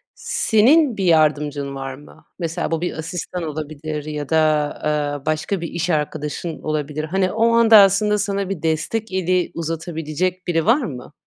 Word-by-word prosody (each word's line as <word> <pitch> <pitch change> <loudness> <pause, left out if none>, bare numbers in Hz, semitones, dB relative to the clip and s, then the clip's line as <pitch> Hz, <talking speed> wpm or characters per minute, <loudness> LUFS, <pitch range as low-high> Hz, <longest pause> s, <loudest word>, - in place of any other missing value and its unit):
Senin 250 +3 +3
bir 195 - -1
yardımcın 150 -3 +2
var 135 0 -5
mı? 145 +2 -17
Mesela, 165 -1 -3
bu 165 0 -1
bir 175 - -2
asistan 175 +2 -5
olabilir 155 0 -5
ya 150 -2 -5
da, 160 - +3 0.5
ııı, 145 -2 -1
başka 155 +4 -1
bir 170 - -3
iş 170 +2 -3
arkadaşın 150 +1 -3
olabilir. 155 0 -2
Hani, 185 +4 0
o 225 +2 +2
anda, 230 -1 +7
aslında, 205 +1 +5
sana 200 -1 -2
bir 195 -6 -4
destek 190 +7 -1
eli 185 -1 0
uzatabilecek 165 +2 -3
biri 165 -2 +1
var 245 +8 +4
mı? 140 - -7
165 Hz, 160 wpm, -21 LUFS, 150-195 Hz, 0.5 s, anda